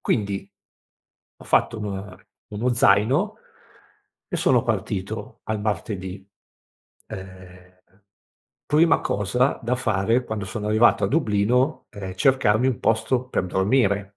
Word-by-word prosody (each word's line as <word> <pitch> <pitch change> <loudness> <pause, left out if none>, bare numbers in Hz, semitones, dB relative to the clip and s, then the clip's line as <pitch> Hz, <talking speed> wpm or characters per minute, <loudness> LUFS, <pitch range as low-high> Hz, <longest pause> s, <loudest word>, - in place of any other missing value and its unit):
Quindi 100 -3 -2 0.9
ho - - -14
fatto 110 - +1
una 100 -1 -6 0.3
uno 115 +4 -1
zaino 110 +3 +3 1.0
e - - +1
sono - - +3
partito - - -4
al 110 -1 -2
martedì, 95 -2 -4 0.8
ehm, 90 -1 -11 0.9
prima 155 +2 +4
cosa 125 +7 0
da 120 +2 0
fare 115 0 +1
quando 105 -2 -4
sono 105 +3 -5
arrivato 110 +3 +4
a - - +1
Dublino, 125 +1 +1
è 95 -2 -7
cercarmi 130 0 +3
un 130 - 0
posto 115 +3 0
per 90 - -1
dormire. 100 0 +1
105 Hz, 115 wpm, -23 LUFS, 95-120 Hz, 1.0 s, prima